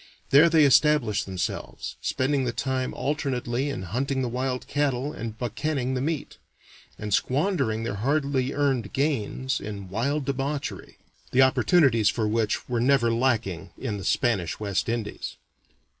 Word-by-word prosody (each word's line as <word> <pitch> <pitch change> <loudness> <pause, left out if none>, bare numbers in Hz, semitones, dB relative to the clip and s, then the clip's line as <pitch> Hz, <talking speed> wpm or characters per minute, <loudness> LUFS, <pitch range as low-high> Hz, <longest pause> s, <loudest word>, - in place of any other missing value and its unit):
There 150 +5 +7
they 160 -2 +5
established 130 -7 +3
themselves, 95 -2 -4
spending 135 +1 0
the 120 - 0
time 130 +1 -2
alternately 135 -2 -1
in 115 -9 -4
hunting 130 +8 -1
the 125 - -1
wild 125 +1 -2
cattle 145 0 -1
and 110 -1 -6
buccanning 130 +2 -2
the 130 - -1
meat, 150 0 -3 0.6
and 105 -1 -4
squandering 135 - +1
their 115 - -2
hardly 135 +3 0
earned 135 -8 0
gains 130 -2 -1
in 100 -2 -6
wild 135 +8 -1
debauchery, 140 +1 -3 0.3
the 130 +1 +5
opportunities 130 - +4
for 110 -3 0
which 110 0 0
were 120 -2 0
never 125 -2 +3
lacking 105 -8 0
in 110 -6 -3
the - - -7
Spanish 100 -10 0
West 100 0 -1
Indies. 115 -3 -4
130 Hz, 145 wpm, -26 LUFS, 110-140 Hz, 0.6 s, There